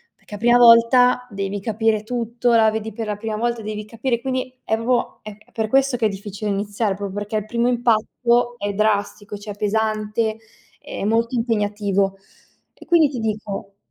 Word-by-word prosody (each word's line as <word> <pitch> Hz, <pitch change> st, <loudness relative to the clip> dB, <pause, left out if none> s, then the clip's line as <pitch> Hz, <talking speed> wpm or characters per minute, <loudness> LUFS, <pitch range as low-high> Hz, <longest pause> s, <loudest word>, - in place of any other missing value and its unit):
Perché 210 Hz, -, -11 dB
a -, -, -6 dB
prima 240 Hz, +3 st, +4 dB
volta 245 Hz, +1 st, +6 dB
devi 200 Hz, 0 st, -3 dB
capire 220 Hz, +1 st, 0 dB
tutto, 235 Hz, +1 st, -1 dB
la 220 Hz, -1 st, +5 dB
vedi 220 Hz, -1 st, -4 dB
per 225 Hz, -1 st, -5 dB
la 210 Hz, -1 st, -3 dB
prima 220 Hz, 0 st, -4 dB
volta, 235 Hz, +1 st, -1 dB
devi 215 Hz, 0 st, -5 dB
capire. 230 Hz, +3 st, -2 dB
Quindi 255 Hz, 0 st, -3 dB
è 220 Hz, -, 0 dB
proprio 235 Hz, +2 st, -1 dB
è 215 Hz, -1 st, -9 dB
è -, -, -26 dB
per 220 Hz, -1 st, -2 dB
questo 270 Hz, +1 st, +2 dB
che 230 Hz, -, 0 dB
è 215 Hz, -, +3 dB
difficile 205 Hz, +1 st, -5 dB
iniziare, 205 Hz, 0 st, -1 dB
proprio 200 Hz, -1 st, -5 dB
perché 205 Hz, +1 st, -4 dB
il 215 Hz, -1 st, -1 dB
primo 235 Hz, +2 st, 0 dB
impatto 240 Hz, 0 st, +1 dB
è 205 Hz, -2 st, -2 dB
drastico, 205 Hz, 0 st, -1 dB
cioè 205 Hz, 0 st, -7 dB
pesante, 215 Hz, +1 st, -1 dB, 0.4 s
è -, -, -7 dB
molto 230 Hz, +3 st, +1 dB
impegnativo 205 Hz, -4 st, 0 dB, 0.6 s
e -, -, -13 dB
quindi 335 Hz, -4 st, +5 dB
ti 270 Hz, -3 st, -5 dB
dico, 210 Hz, -2 st, -4 dB
220 Hz, 180 wpm, -21 LUFS, 205-235 Hz, 0.6 s, volta